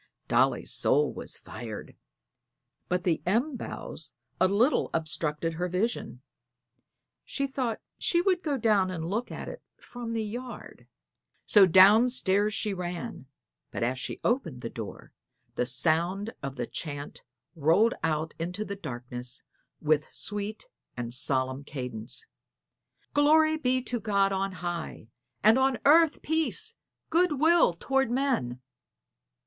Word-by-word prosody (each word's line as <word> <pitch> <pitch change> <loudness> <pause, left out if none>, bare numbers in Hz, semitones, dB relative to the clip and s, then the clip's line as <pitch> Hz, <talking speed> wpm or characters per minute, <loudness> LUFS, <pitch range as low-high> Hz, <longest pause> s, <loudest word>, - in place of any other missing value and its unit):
Dolly's - - +2
soul 445 - +2
was - - -6
fired. - - -8 0.9
But 180 0 0
the 170 -3 +1
elm 240 - +1
boughs 155 - -6 0.3
a 185 - +5
little 225 +9 +2
obstructed 160 0 -1
her 175 +2 -2
vision; 195 +7 -2 1.0
she 275 - -2
thought 260 -4 -2 0.2
she 345 - +3
would 365 0 +2
go 295 -6 -1
down 210 -5 +3
and 165 -3 -4
look 215 +8 -2
at - - -6
it - - -8 0.2
from 240 -2 -7
the 225 -1 -1
yard. 240 +3 -8 0.6
So 200 -3 +7
down 200 +7 +7
stairs 205 -3 +2
she 210 -1 -1
ran, 175 -7 -5 0.4
but - - -3
as 125 +2 0
she - - -5
opened 195 - 0
the 115 - -5
door 110 -3 -8 0.4
the 125 - -1
sound 170 - +1
of 135 -1 -5
the 120 -2 -3
chant 145 +2 -6 0.3
rolled 170 +10 +4
out 155 0 -1
into 180 +6 -3
the 200 - -5
darkness 125 -6 -4 0.4
with 155 -1 +1
sweet 210 - -3 0.3
and 120 -1 -4
solemn 130 +1 +1
cadence: 125 - -3 0.9
"_Glory 310 +2 +4
be 255 -1 +1
to 245 -1 -2
God 200 -2 +2
on 195 0 -1
high; 170 -9 -5 0.3
and 220 +5 +6
on 265 -1 +2
earth 315 +1 +5
peace, 325 +9 0 0.4
good 330 -4 +2
will 335 - +5
toward 270 +8 0
men. 245 - 0
195 Hz, 135 wpm, -28 LUFS, 155-250 Hz, 1.0 s, So